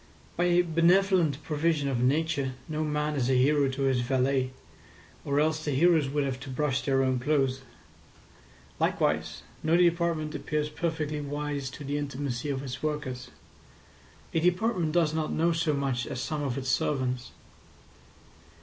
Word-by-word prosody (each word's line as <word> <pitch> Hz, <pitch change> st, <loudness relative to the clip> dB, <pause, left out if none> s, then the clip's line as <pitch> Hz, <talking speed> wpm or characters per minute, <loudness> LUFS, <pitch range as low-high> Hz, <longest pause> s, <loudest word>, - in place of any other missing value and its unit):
By 175 Hz, -, +1 dB
a 175 Hz, 0 st, +4 dB
benevolent 170 Hz, -2 st, +3 dB
provision 155 Hz, -1 st, 0 dB
of 130 Hz, -3 st, 0 dB
Nature 140 Hz, 0 st, +1 dB
no 155 Hz, 0 st, -2 dB
man 150 Hz, 0 st, -1 dB
is 130 Hz, -3 st, 0 dB
a 130 Hz, -, +3 dB
hero 140 Hz, +1 st, +3 dB
to 135 Hz, +1 st, -3 dB
his 135 Hz, -2 st, +2 dB
valet, 130 Hz, +1 st, +1 dB, 0.7 s
or 140 Hz, 0 st, 0 dB
else 155 Hz, +1 st, +1 dB
the 150 Hz, -, -1 dB
heroes 160 Hz, -1 st, +4 dB
would 145 Hz, +1 st, 0 dB
have 130 Hz, -2 st, -2 dB
to 135 Hz, +1 st, -9 dB
brush 135 Hz, +1 st, 0 dB
their 135 Hz, -1 st, +2 dB
own 130 Hz, -1 st, +1 dB
clothes. 135 Hz, -1 st, +1 dB, 1.2 s
Likewise -, -, 0 dB, 0.2 s
no 160 Hz, +2 st, +3 dB
department 170 Hz, -3 st, +2 dB
appears 150 Hz, -1 st, -2 dB
perfectly 155 Hz, -2 st, -2 dB
wise 145 Hz, -1 st, -3 dB
to 145 Hz, -, -9 dB
the 145 Hz, +1 st, -2 dB
intimacy 140 Hz, -1 st, -3 dB
of 135 Hz, -1 st, -2 dB
its 130 Hz, -2 st, -6 dB
workers. 130 Hz, -5 st, -3 dB, 1.0 s
A 165 Hz, -, +2 dB
department 180 Hz, 0 st, +1 dB
does 165 Hz, -2 st, +2 dB
not 160 Hz, -1 st, -1 dB
know 170 Hz, +2 st, +2 dB
so 165 Hz, -1 st, +1 dB
much 135 Hz, -4 st, -1 dB
as 130 Hz, -, -4 dB
some 150 Hz, +3 st, -3 dB
of 135 Hz, -3 st, -2 dB
its 130 Hz, -1 st, -3 dB
servants. 130 Hz, -2 st, 0 dB
145 Hz, 160 wpm, -28 LUFS, 135-160 Hz, 1.2 s, a